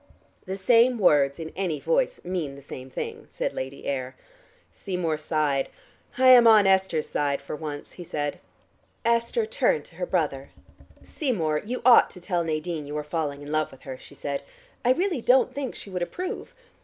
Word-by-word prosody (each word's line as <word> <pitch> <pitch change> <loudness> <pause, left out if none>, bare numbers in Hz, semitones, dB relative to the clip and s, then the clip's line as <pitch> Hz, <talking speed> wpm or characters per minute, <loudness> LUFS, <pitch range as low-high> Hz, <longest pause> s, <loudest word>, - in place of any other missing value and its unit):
"The 190 +1 -3
same 235 +5 +4
words 145 -8 +4
in 160 -1 -6
any 175 -5 -1
voice - - 0
mean 170 -6 -3
the 140 - -13
same 130 -1 -9
thing," - - -6
said - - -3
Lady 135 +1 -6
Ayr. 130 -1 -3 0.6
Seymour 175 -5 -2
sighed. 150 -3 0 0.5
"I 260 0 +6
am 245 -2 +9
on 215 -3 +7
Esther's 190 -5 +2
side 140 -1 0
for 140 - -6
once," 150 -2 -6
he 180 - -9
said. 145 -3 -3 0.7
Esther 235 - +2
turned 475 +1 +1
to - - -18
her - - -2
brother. - - -1 0.5
"Seymour, 170 - -1
you 245 +2 -4
ought 250 -2 +8
to 180 - -12
tell 175 -1 -1
Nadine 155 -1 -3
you 150 +1 -4
are 150 - -2
falling 150 -2 -3
in 145 - -7
love 155 0 +1
with 135 - -16
her," 130 -1 -7
she 140 - -14
said. 140 0 -3 0.4
"I 245 - +4
really 345 -1 +1
don't 255 +3 +4
think 275 -3 -4
she 200 - -10
would 180 -1 -3
approve. 365 - -5
170 Hz, 180 wpm, -26 LUFS, 145-235 Hz, 0.7 s, am